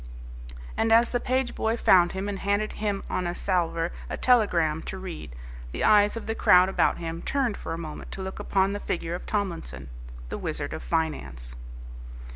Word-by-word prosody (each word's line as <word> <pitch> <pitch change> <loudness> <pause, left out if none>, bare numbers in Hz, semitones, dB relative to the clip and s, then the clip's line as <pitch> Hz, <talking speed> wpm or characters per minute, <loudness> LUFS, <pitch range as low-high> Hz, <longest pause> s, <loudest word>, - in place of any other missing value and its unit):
And 225 - +1
as 230 +1 +5
the 245 - +1
page 255 0 0
boy 225 +1 0
found 175 -5 +5
him 190 +1 -3
and 200 -1 -3
handed 205 +2 0
him 205 -2 -2
on 180 - -1
a 175 - -3
salver 170 -3 0 0.2
a - - -3
telegram 170 -11 +3
to 190 - -5
read, 175 - -7 0.4
the - - -2
eyes 210 +1 +5
of 230 - -6
the 225 - -1
crowd 180 -4 +5
about - - +2
him 165 0 -5
turned 260 -6 0
for - - -7
a 165 - -2
moment 155 -2 -7
to 190 - -4
look 190 +1 -6
upon 195 -1 +1
the 205 - -3
figure 170 -3 -3
of 175 - -6
Tomlinson, 170 - -3 0.4
the - - -4
Wizard - - -3
of - - -5
Finance. 60 - -2
190 Hz, 190 wpm, -26 LUFS, 165-210 Hz, 0.4 s, as